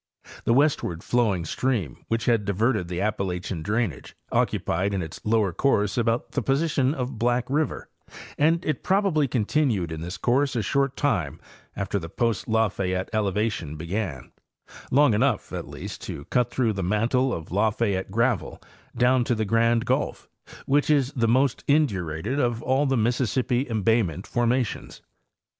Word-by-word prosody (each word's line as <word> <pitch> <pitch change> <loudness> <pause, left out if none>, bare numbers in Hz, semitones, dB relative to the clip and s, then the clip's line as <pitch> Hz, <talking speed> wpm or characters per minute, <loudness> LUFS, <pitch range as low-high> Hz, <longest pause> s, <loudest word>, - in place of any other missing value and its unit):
The 115 - +3
westward 140 - +1
flowing 105 -8 +1
stream 105 - -2
which 115 0 -1
had 115 -3 +2
diverted 100 0 0
the 90 0 -4
Appa 105 +1 -1
lachian 90 -2 -3
drainage 105 - -2 0.2
occupied 95 +4 0
in 95 - -1
its 80 - -8
lower 105 -4 +1
course 105 -4 +1
about 115 -1 0
the 140 - -1
position 140 +1 +1
of 125 -3 -4
Black 120 +1 +1
river, 150 +2 -1 0.5
and 165 +3 +2
it 155 -4 -1
probably 190 -7 +2
continued 115 - 0
in 80 -1 -5
this 90 +3 -5
course 135 +2 +1
a 115 - 0
short 135 +5 0
time 85 - 0 0.4
after 100 0 -2
the 85 -2 -7
post 115 +3 -1
Lafayette 95 -5 0
elevation 105 -6 -1
began—long 95 - -2
enough, 130 +6 0
at - - -4
least, - - -8
to 70 - -7
cut 125 -1 +2
through 120 -3 0
the 95 - -3
mantle 115 +7 +1
of 80 -8 -5
Lafayette 105 -1 0
gravel 115 0 0 0.4
down 125 +1 +4
to 120 - +1
the 110 -1 -1
Grand 115 +2 +2
gulf, - - -1 0.4
which 145 +2 +2
is 140 -3 +3
the 115 -3 +1
most 130 +3 +2
indurated 105 - 0
of 120 -3 0
all 135 +3 +2
the 135 -1 +1
Mississippi 125 +3 0
embayment 110 -5 +1
formations. 120 0 -1
115 Hz, 150 wpm, -25 LUFS, 95-130 Hz, 0.5 s, down